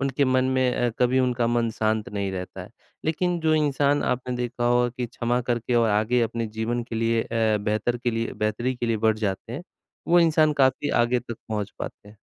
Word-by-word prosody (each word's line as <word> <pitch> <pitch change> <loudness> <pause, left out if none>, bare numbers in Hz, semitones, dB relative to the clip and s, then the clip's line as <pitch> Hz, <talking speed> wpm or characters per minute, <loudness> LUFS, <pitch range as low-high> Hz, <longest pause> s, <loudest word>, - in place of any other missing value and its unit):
उनके 135 +1 +1
मन 130 -1 +2
में 130 -1 +2
अ, 120 - +1
कभी 125 +1 +3
उनका 125 -2 +1
मन 115 -1 +1
शांत 110 +1 -1
नहीं 100 -3 -3
रहता 90 -1 -6
है, - - -12 0.3
लेकिन 175 +3 0
जो 160 -1 +2
इंसान 145 -1 +2
आपने 125 0 -1
देखा 120 0 -3
होगा 120 0 +3
कि 125 -1 -2
क्षमा 120 +1 -1
करके 120 +1 0
और 115 -1 +4
आगे 110 +4 +2
अपने 115 0 -2
जीवन 110 +2 -2
के 115 - -8
लिए 115 0 +1
अ, 110 -2 +1
बेहतर 110 +3 -1
के 120 0 -1
लिए 115 0 -2
बेहतरी 110 +4 -1
के 120 - -2
लिए 115 -1 +1
बढ़ 110 -1 +2
जाते 100 +1 -3
हैं, 140 +8 -5 0.5
वो 175 0 +6
इंसान 155 -2 +4
काफ़ी 130 +2 +2 0.2
आगे 125 +1 +1
तक 120 -2 -8
पहुँच 105 -2 -3
पाते 105 - -7
हैं। 105 - -16
120 Hz, 215 wpm, -25 LUFS, 110-130 Hz, 0.5 s, वो